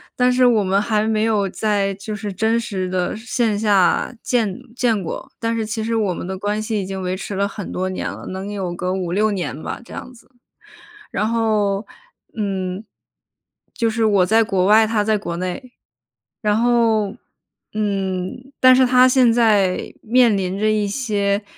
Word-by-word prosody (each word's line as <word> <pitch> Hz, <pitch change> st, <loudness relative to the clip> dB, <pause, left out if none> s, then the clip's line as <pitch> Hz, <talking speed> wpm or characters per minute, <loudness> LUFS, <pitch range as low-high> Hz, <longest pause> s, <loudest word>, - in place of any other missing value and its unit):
但 250 Hz, 0 st, +3 dB
是 250 Hz, 0 st, +3 dB
我 225 Hz, -4 st, +4 dB
们 195 Hz, +2 st, +2 dB
还 215 Hz, -1 st, 0 dB
没 215 Hz, -1 st, +1 dB
有 210 Hz, -3 st, +1 dB
在 200 Hz, -1 st, 0 dB
就 205 Hz, +2 st, -6 dB
是 210 Hz, -1 st, -5 dB
真 220 Hz, +4 st, +1 dB
实 195 Hz, -5 st, -3 dB
的 180 Hz, -1 st, -1 dB
线 225 Hz, -2 st, -1 dB
下 205 Hz, +1 st, +2 dB
见 220 Hz, -6 st, 0 dB, 0.2 s
见 225 Hz, -6 st, +1 dB
过， 160 Hz, -, -6 dB
但 230 Hz, 0 st, -1 dB
是 225 Hz, -1 st, -1 dB
其 220 Hz, +1 st, -3 dB
实 230 Hz, +1 st, -1 dB
我 205 Hz, -5 st, +1 dB
们 -, -, -6 dB
的 190 Hz, +1 st, -4 dB
关 205 Hz, +2 st, -2 dB
系 215 Hz, -1 st, -2 dB
已 -, -, -4 dB
经 190 Hz, 0 st, -5 dB
维 185 Hz, 0 st, -2 dB
持 200 Hz, 0 st, -6 dB
了 200 Hz, +1 st, +1 dB
很 200 Hz, -1 st, -7 dB
多 185 Hz, +1 st, -2 dB
年 185 Hz, -, -3 dB
了， -, -, -8 dB
能 190 Hz, +2 st, -5 dB
有 190 Hz, -4 st, -3 dB
个 180 Hz, +1 st, -2 dB
5-6 190 Hz, +3 st, 0 dB
年 165 Hz, -6 st, -4 dB
吧， -, -, -5 dB
这 -, -, -13 dB
样 255 Hz, -, -8 dB
子。 235 Hz, -, -19 dB, 0.8 s
然 210 Hz, +2 st, 0 dB
后， 215 Hz, -3 st, 0 dB, 0.5 s
嗯， 195 Hz, -1 st, -3 dB, 0.9 s
就 230 Hz, -2 st, 0 dB
是 225 Hz, 0 st, 0 dB
我 200 Hz, -4 st, +4 dB
在 225 Hz, +4 st, +4 dB
国 195 Hz, -4 st, 0 dB
外， 220 Hz, +2 st, +5 dB
他 215 Hz, -1 st, +1 dB
在 215 Hz, 0 st, +2 dB
国 170 Hz, -4 st, -5 dB
内。 185 Hz, +8 st, -5 dB, 0.7 s
然 210 Hz, -1 st, +2 dB
后， 225 Hz, -3 st, +2 dB, 0.6 s
嗯， 200 Hz, +4 st, -3 dB
但 255 Hz, 0 st, +7 dB
是 260 Hz, 0 st, +5 dB
他 250 Hz, 0 st, +6 dB
现 255 Hz, -2 st, +4 dB
在 210 Hz, -6 st, +2 dB
面 235 Hz, -1 st, +4 dB
临 190 Hz, 0 st, -2 dB
着 215 Hz, -, +2 dB
一 210 Hz, -1 st, +1 dB
些 205 Hz, -3 st, -1 dB
210 Hz, 195 characters per minute, -20 LUFS, 195-225 Hz, 0.9 s, 但